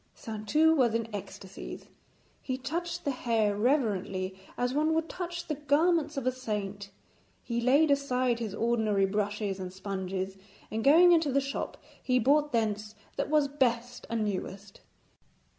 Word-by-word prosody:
Saintou 230 +9 +2
was 240 -6 +3
in 230 -1 -1
ecstasies. 195 -1 -8 0.6
He 255 -1 -3
touched 340 +6 -4
the 285 - +1
hair 225 -5 +1
reverently 205 -6 0 0.2
as 245 +1 0
one 310 +2 +2
would 325 0 0
touch 345 -1 -5
the 310 - -2
garments 300 +1 +2
of 270 - -2
a 255 - +3
saint. 205 -5 -4 0.5
He 235 -1 -2
laid 285 +5 +4
aside 255 -3 +1
his 215 -4 -4
ordinary 220 -4 +2
brushes 205 0 -2
and 185 -1 -5
sponges, 190 0 -4 0.3
and 220 +1 -2
going 340 +5 +7
into 325 -4 +4
the 275 - +3
shop 275 0 -4 0.2
he 255 -1 +2
brought 290 +5 +3
thence 215 -2 -1 0.2
what - - -2
was 300 -2 +3
best 245 -3 -1
and 225 -2 0
newest. 195 0 -5
240 Hz, 150 wpm, -29 LUFS, 205-285 Hz, 0.6 s, going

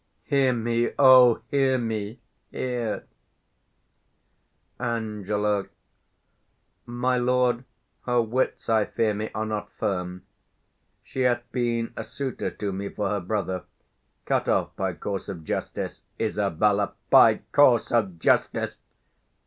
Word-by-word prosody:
Hear 135 -3 +2
me, 120 0 0
O 130 -3 +7
hear 135 -2 +3
me, 110 -2 -3 0.3
here! 120 -4 -3 1.7
Ang. 105 -3 -1 1.2
My 125 +1 0
lord, 125 0 +2 0.4
her 125 -1 +3
wits, 120 +3 -1
I 110 -2 +3
fear 110 -2 0
me, 105 +1 -4
are 110 0 -1
not 105 -1 -4
firm: 90 -1 -3 0.8
She 130 - -5
hath 120 -1 +2
been 120 -2 -1
a - - -4
suitor 135 -3 -4
to 105 -2 -4
me 100 +1 -4
for 105 -2 -2
her 105 - 0
brother 95 -1 -3 0.6
Cut - - 0
off - - 0
by 95 -1 -2
course 100 +2 -5
of 85 -5 -6
justice, - - -4 0.2
Isab. 105 -1 0
By - - +7
course 130 -6 +4
of 100 -7 +1
justice! 80 - +1
110 Hz, 115 wpm, -25 LUFS, 100-125 Hz, 1.7 s, O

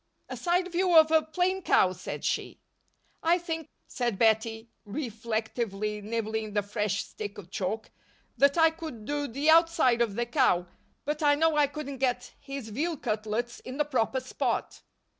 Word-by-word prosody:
"A - - -4
side 360 +1 0
view 355 -1 +3
of 315 0 +7
a 320 0 +6
plain 365 +4 0
cow," 185 - +4
said - - -6
she. - - -2 0.6
"I 335 +2 +4
think," 325 -3 -5 0.2
said 240 -5 -2
Bettie, 225 +1 +2 0.2
reflectively 220 -3 -3
nibbling 220 0 -3
the 205 -1 +1
fresh 205 -1 -1
stick 205 -1 -7
of 190 -3 -11
chalk, 210 +4 -3 0.4
"that 280 +3 +4
I 325 -1 +6
could 315 -10 -8
do 290 +2 -2
the 280 +6 +2
outside 320 -7 +4
of 220 -4 +1
that 240 +1 -2
cow, 185 - +3 0.4
but 300 +1 -2
I 290 -1 +5
know 320 +1 +2
I 295 -1 +4
couldn't 280 -2 -6
get 255 -2 -1
his 275 -5 -7
veal 310 +9 -2
cutlets 220 0 -2
in 255 +1 -8
the 295 - +2
proper 260 -2 0
spot." 255 - -2
255 Hz, 165 wpm, -28 LUFS, 220-315 Hz, 0.6 s, of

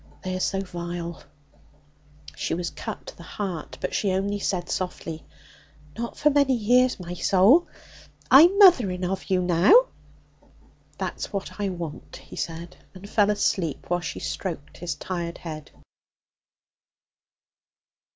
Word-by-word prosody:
They 185 0 -3
are - - -3
so 195 +1 0
vile.' 175 -2 -6 1.1
She - - -2
was 170 -2 -3
cut 150 - -7
to - - -10
the - - -14
heart, 175 -2 -5
but - - -3
she 200 - +1
only 200 +2 -1
said 180 -3 -2
softly: 165 -3 -4 0.7
'Not 235 0 -5
for 300 0 +3
many 280 -2 +3
years, 245 +2 +3
my 175 -1 -6
soul! 200 - +4 0.6
I'm 335 +9 +8
mothering 235 - +6
of 190 +1 -4
you 185 -1 +2
now!' 185 - +5 1.1
'That's - - -4
what 200 0 -5
I 200 - 0
want,' 170 -4 -7
he - - -12
said, 170 +1 -5 0.2
and 185 +2 -10
fell 205 0 +2
asleep 170 -8 -1
while 175 - +2
she 175 - -5
stroked' 155 -6 -5
his 170 -4 -3
tired 170 +2 -5
head. 155 -3 -8
185 Hz, 135 wpm, -25 LUFS, 170-210 Hz, 1.1 s, I'm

